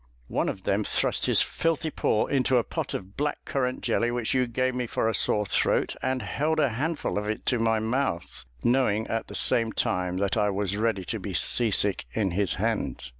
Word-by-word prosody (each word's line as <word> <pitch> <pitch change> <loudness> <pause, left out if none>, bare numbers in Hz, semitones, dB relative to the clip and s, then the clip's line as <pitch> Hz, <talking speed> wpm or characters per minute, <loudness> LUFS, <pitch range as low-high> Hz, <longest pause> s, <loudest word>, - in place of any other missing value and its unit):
One - - 0
of 95 - -6
them 100 +2 +1
thrust - - 0
his - - +4
filthy 165 -1 -1
paw 110 - +1
into 130 -2 +2
a 120 - +3
pot - - -4
of 95 +2 -7
black 145 +1 -2
currant 130 -2 -2
jelly, 120 -1 +1
which 120 -2 -1
you 130 -1 +2
gave 130 +2 0
me 125 -1 -2
for 110 - -1
a 115 - +1
sore 105 -1 +1
throat, - - +1
and 130 0 -1
held 155 +3 -1
a 145 -3 +3
handful 145 0 -2
of 105 0 -4
it 110 - -4
to 125 - +1
my 115 0 +2
mouth, 110 - -2 0.2
knowing 120 -4 +2
at 115 0 -3
the - - -8
same 115 -1 +3
time 90 -3 0
that 100 0 0
I 105 -1 +2
was 100 0 -1
ready 105 -3 -1
to 110 +4 -3
be 95 -1 -5
sea 120 +4 +4
sick 100 -1 +1
in 100 -4 0
his 95 0 +1
hand." - - -2
115 Hz, 215 wpm, -26 LUFS, 100-130 Hz, 0.2 s, his